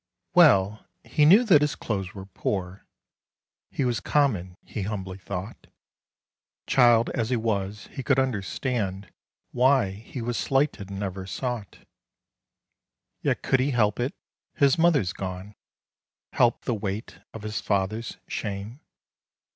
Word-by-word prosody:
WELL 110 - +5 0.2
he 150 - +2
knew 200 +10 +7
that 180 -11 +5
his 150 -1 +1
clothes 95 -3 -4
were 95 -1 -7
poor: 95 -1 -4 0.8
He 135 - -1
was 120 -2 0
common, 100 -12 0
he 105 - -5
humbly 95 -2 -4
thought; 95 +3 -7 1.0
Child 120 -2 +4
as 115 -1 -1
he 130 - +2
was, 105 -3 -2
he 135 - -5
could 135 +1 +2
understand 105 -5 -2 0.4
Why 125 -5 +3
he 110 +6 -9
was 120 0 -2
slighted 135 -8 0
and 100 0 -6
never 95 -1 -4
sought. 120 -2 -5 1.4
Yet - - 0
could 135 - +2
he 130 +3 +1
help 110 -5 +1
it, 125 +3 -1 0.4
his 140 -2 +4
mother 165 -6 +4
gone, 95 +2 -6 0.8
Help - - +2
the - - 0
weight 105 0 -4
of 110 - -9
his 110 0 -3
father's 105 +3 -1
shame? 105 +4 -5
110 Hz, 130 wpm, -26 LUFS, 95-130 Hz, 1.4 s, knew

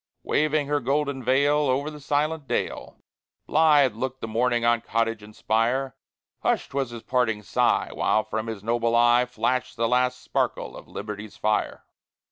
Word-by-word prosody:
Waving 155 0 +1
her 145 +1 0
golden 140 0 -1
veil 140 +4 +3
Over 140 +4 0
the 150 - -10
silent 150 +1 -1
dale, 120 - -3 0.5
Blithe 150 -5 +4
looked 130 +3 -4
the - - -4
morning 120 +1 +1
on 120 -1 +3
cottage 115 -1 -1
and 105 0 -14
spire; 120 +4 0 0.4
Hushed - - -1
was 135 -2 -1
his 120 -1 -9
parting 115 -4 0
sigh, - - +1
While 110 - +1
from 110 +1 -4
his 110 -3 -6
noble 115 +1 +1
eye 120 +1 +4
Flashed 125 +2 -1
the 115 0 +1
last 125 +1 +1
sparkle - - -2
of - - -11
liberty's 105 -1 -7
fire. 110 0 -1
125 Hz, 160 wpm, -25 LUFS, 115-140 Hz, 0.5 s, Blithe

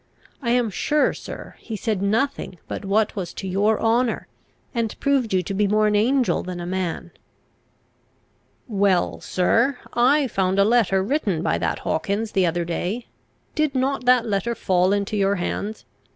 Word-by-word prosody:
I 240 - -2
am 240 -2 +2
sure, 300 +8 +1
sir, - - -9
he 225 - -6
said 215 -2 -2
nothing 215 -1 -1
but - - -5
what 205 +2 +1
was 185 -4 -5
to 190 - -5
your 205 +4 +2
honour, 230 +1 +1 0.5
and 230 -3 -2
proved 275 -5 +1
you 185 -1 +2
to 195 - -4
be 205 +1 +2
more 215 +1 +3
an 210 0 +2
angel 250 +4 +2
than 180 -1 -6
a 175 - -5
man." 185 -1 -3 1.6
"Well, 195 -5 +1
sir: 230 +8 +1 0.2
I 270 +5 +4
found 190 -5 0
a 200 - +5
letter 205 -4 +3
written 205 - 0
by 85 - +1
that 85 -1 -1
Hawkins 200 +7 -1
the 190 -3 +2
other 170 +1 -1
day; 185 +7 -3 0.5
did 305 -3 0
not 260 0 0
that 250 -1 +5
letter 215 +2 -1
fall 185 -2 +2
into 205 +1 0
your 200 0 +2
hands? 200 +4 -4
210 Hz, 165 wpm, -23 LUFS, 190-240 Hz, 1.6 s, a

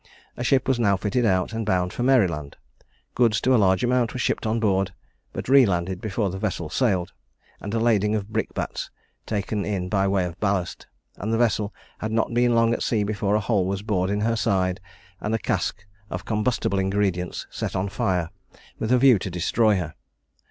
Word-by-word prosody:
A 120 - -4
ship 130 +1 +2
was 130 -2 +2
now 100 -4 +3
fitted 110 +5 0
out, 95 +2 +1
and 115 0 -2
bound 90 -2 0
for - - -4
Maryland: 90 - +2 0.6
goods 115 -4 +3
to 130 - +3
a - - +6
large 95 +1 +3
amount 125 -1 +1
were 130 - -4
shipped 120 - 0
on 110 +1 0
board, 95 -3 +1 0.4
but - - -6
re 135 +1 +7
landed 90 -3 -1
before 105 -2 -1
the 95 - -5
vessel 90 -6 -3
sailed, 95 -7 0 0.5
and 100 - -6
a 115 - 0
lading 110 -2 +2
of 105 -1 -3
brick - - -1
bats - - -4 0.4
taken 105 -1 -2
in 95 -3 -2
by 100 -1 +2
way 95 -2 +1
of 90 0 -7
ballast; 100 -4 -1 0.3
and 105 +4 -3
the 115 - +2
vessel 110 -3 +1 0.3
had 110 - -3
not 115 +1 0
been 120 0 +3
long 115 0 +4
at - - -3
sea 110 -3 +1
before 100 0 0
a - - +3
hole 100 -3 +1
was 100 +1 -3
bored 95 -4 0
in 105 +1 0
her 115 +1 +1
side, 95 -4 0 0.4
and 110 +2 -1
a - - +2
cask 100 -3 -2 0.2
of 90 - -5
combustible 105 -2 0
ingredients 95 -2 -1
set - - -4
on 95 +2 0
fire 90 -4 -1 0.5
with 110 - -2
a 125 - +6
view 125 -4 +6
to 95 - -4
destroy 100 +5 +2
her. 85 -4 -4
105 Hz, 205 wpm, -24 LUFS, 95-115 Hz, 0.6 s, re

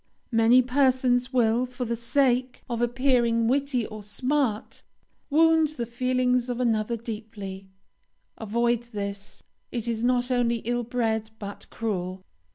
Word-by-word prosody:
Many 230 +2 +5
persons 255 -1 +2
will, 240 0 +2
for 250 0 -5
the 235 0 -1
sake 250 +1 0
of 235 -1 -3
appearing 240 -2 +2
witty 265 -2 +1
or 215 0 -8
smart, 245 +2 -1 0.5
wound 320 +1 +4
the 235 - -2
feelings 250 +1 0
of 245 0 -2
another 230 -1 +1
deeply; 210 -4 -7 0.7
avoid 235 +2 0
this; 200 -1 -5 0.3
it 235 -2 -3
is 230 -1 -2
not 245 0 +1
only 240 -1 +2
ill 240 +1 0
bred, 225 -2 -1
but 205 -1 -8
cruel. 185 -4 -3
240 Hz, 130 wpm, -26 LUFS, 220-255 Hz, 0.7 s, Many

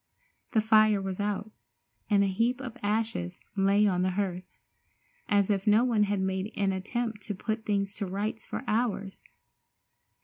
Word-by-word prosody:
The 220 - +4
fire 215 -1 +5
was 195 -1 -4
out, 205 +1 -2 0.6
and 200 -2 +4
a - - +2
heap 230 +6 +1
of 250 -4 -7
ashes 210 -4 -1 0.2
lay 200 +1 +4
on 180 -3 +2
the 185 - +2
hearth, 185 -1 -3 0.7
as 205 0 +3
if 195 0 -1
no 215 +3 +6
one 225 -4 +3
had 205 -1 -1
made 190 +2 -1
an 195 -1 +2
attempt 220 +3 -3
to 205 +1 -5
put 220 +3 -3
things 200 -1 0
to 200 - -3
rights 205 +4 -3
for - - -5
hours. 210 -4 -1
205 Hz, 165 wpm, -29 LUFS, 195-220 Hz, 0.7 s, no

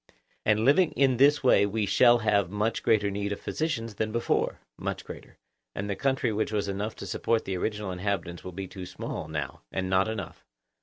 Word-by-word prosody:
And 105 0 +3
living 155 +5 +4
in 135 -3 +3
this 145 +3 +5
way 125 -5 +5
we 105 +1 -1
shall 120 +4 +5
have 100 -5 +2
much 105 +3 -1
greater 105 -2 +2
need 100 +1 -2
of 100 - -3
physicians 135 -9 -2
than 110 +1 -2
before? 115 +1 0 0.2
Much - - -4
greater. - - -11 0.4
And 100 - -3
the 100 - -1
country 130 -3 0
which 110 +1 -1
was 105 -1 -1
enough 100 +3 -3
to - - -8
support 115 -1 0
the 95 - -2
original 105 +1 -2
inhabitants 90 -2 -3
will 90 - -6
be 95 +2 -5
too 90 -1 -8
small 80 - -5
now, 75 -3 -4
and 95 0 -2
not 95 +2 +3
enough? 110 -5 -6
105 Hz, 200 wpm, -28 LUFS, 95-115 Hz, 0.4 s, this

